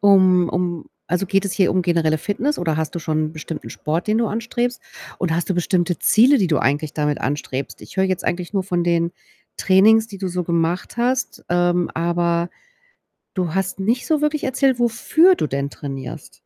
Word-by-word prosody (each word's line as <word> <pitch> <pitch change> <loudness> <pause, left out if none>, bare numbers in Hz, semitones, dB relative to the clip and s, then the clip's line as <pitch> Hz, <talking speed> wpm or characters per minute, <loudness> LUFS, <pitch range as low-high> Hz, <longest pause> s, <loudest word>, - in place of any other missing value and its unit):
um 185 -3 +5
um 175 -2 -2 0.2
also, 180 +3 0
geht 195 +1 +1
es 200 - -2
hier 190 -3 +2
um 185 -1 +1
generelle 165 -3 +1
Fitness 235 - -1
oder 160 -3 -1
hast 160 +1 -3
du - - -2
schon 155 0 -1
bestimmten 160 0 -7
Sport, 160 +5 -3
den 215 +1 +2
du 230 - +1
anstrebst? 240 +2 -2 0.4
Oder 170 -3 0
hast 175 - -2
du 190 - +2
bestimmte 175 -1 0
Ziele, 255 +5 +5
die 190 - +2
du 150 -5 +2
eigentlich 145 +3 0
damit 150 -1 -1
anstrebst? 140 -1 -4
Ich - - -13
höre 190 - +3
jetzt 185 -2 -1
eigentlich 175 +2 -2
nur 195 -2 0
von 175 -2 -1
den 170 0 +1 0.5
Trainings, 215 +4 +5
die 200 -2 -9
du 190 -1 -3
so 180 0 -3
gemacht 170 +5 -1
hast, 250 +2 -1
ähm, 175 0 +1
aber 170 0 0 0.9
du 180 -4 -1
hast 195 0 -2
nicht 230 +6 0
so 310 -2 +1
wirklich 300 0 0
erzählt, 260 -1 +1
wofür 315 +10 +4
du 155 - -1
denn 140 +1 -2
trainierst. 135 - -8
180 Hz, 195 wpm, -21 LUFS, 165-215 Hz, 0.9 s, um